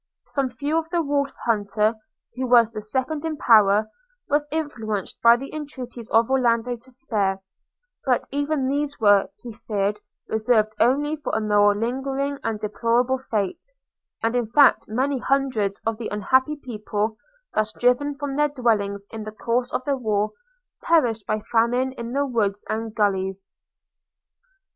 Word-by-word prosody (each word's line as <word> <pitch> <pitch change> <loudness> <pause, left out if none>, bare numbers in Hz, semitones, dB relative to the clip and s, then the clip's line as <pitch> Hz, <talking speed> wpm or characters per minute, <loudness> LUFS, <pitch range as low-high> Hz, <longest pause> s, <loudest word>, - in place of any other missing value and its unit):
Some 275 -2 -1
few 290 +6 -1
the 340 -1 0
Wolf 280 -1 0
hunter, 215 -1 +1 0.4
who 255 0 -2
was 235 -2 +5
the 215 -2 -6
second 260 +8 -2
in 320 -2 -3
power, 215 -3 +5 0.4
was 295 0 +1
influenced 225 - -3
by 235 -1 +7
the 275 +3 -8
entreaties 255 -6 -7
of 225 +3 +3
Orlando 245 -2 +2
to 240 +3 -17
spare; 215 -7 -1 0.6
but 255 -3 +1
even 285 -1 0
these 285 +1 -2
were, 205 -3 +4
he 240 -2 -7
feared, 210 -2 -2 0.3
reserved 220 -1 +2
only 290 +5 +2
for 295 - -4
a - - +2
more 205 -1 +3
lingering 270 +5 -2
and 220 -2 -2
deplorable 235 +4 +1
fate; 210 -7 -2 0.6
and 225 +2 +1
in 240 -2 0
fact 285 +6 +5
many 260 +5 0
hundreds 250 -8 0
of 225 0 -1
the 230 - -3
unhappy 260 +8 +1
people, 215 -5 -3 0.4
thus 215 0 0
driven 250 +5 +1
from 280 -1 -4
their 295 +1 +2
dwellings 210 -7 0
in 220 -1 -6
the 215 - -6
course 235 +3 -1
of - - -2
the 280 - +1
war, 215 -4 0 0.5
perished 240 -10 +2
by 215 - 0
famine 245 +3 +2
in 235 -2 -7
the 285 +1 +1
woods 210 -6 -1
and 225 0 -3
gullies. 195 -2 0
235 Hz, 155 wpm, -23 LUFS, 215-275 Hz, 0.6 s, by